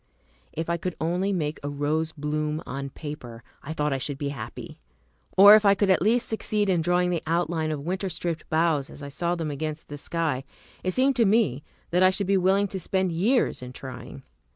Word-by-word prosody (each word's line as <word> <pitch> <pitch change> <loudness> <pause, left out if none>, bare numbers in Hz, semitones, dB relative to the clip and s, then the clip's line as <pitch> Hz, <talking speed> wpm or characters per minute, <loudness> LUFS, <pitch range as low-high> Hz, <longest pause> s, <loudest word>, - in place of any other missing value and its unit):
If 165 +1 -4
I 170 0 0
could 180 +1 -4
only 180 +5 0
make 155 -5 -2
a 145 - -4
rose 150 +3 -1
bloom 150 +1 -2
on 140 +1 -5
paper, 125 -6 -8 0.2
I 150 - -7
thought 150 -2 0
I 135 - -1
should 140 +1 -4
be 140 0 -2
happy! 140 - -8 0.6
or 200 +2 +10
if 215 0 +7
I 200 -1 +5
could 200 -1 +2
at 185 - +3
last 230 +5 +2
succeed 210 -2 -1
in 175 -3 +2
drawing 180 +2 +2
the 170 - -1
outline 165 -1 0
of 150 -2 -4
winter 190 +2 -2
stripped 170 -1 -4
boughs 160 -3 +1
as 145 - -11
I 140 - -6
saw 170 +5 -1
them 165 -3 -3
against 155 +2 -5
the 145 0 -7
sky, 155 -5 -2 0.4
it 185 - -1
seemed 265 +1 +3
to 230 - +4
me 195 - +2 0.3
that 180 +1 +2
I 185 - +7
should 195 +1 -1
be 195 +2 +2
willing 195 +2 +3
to 190 - -4
spend 190 0 0
years 210 - +1
in 125 0 -8
trying. 130 -1 -9
165 Hz, 215 wpm, -26 LUFS, 150-190 Hz, 0.6 s, or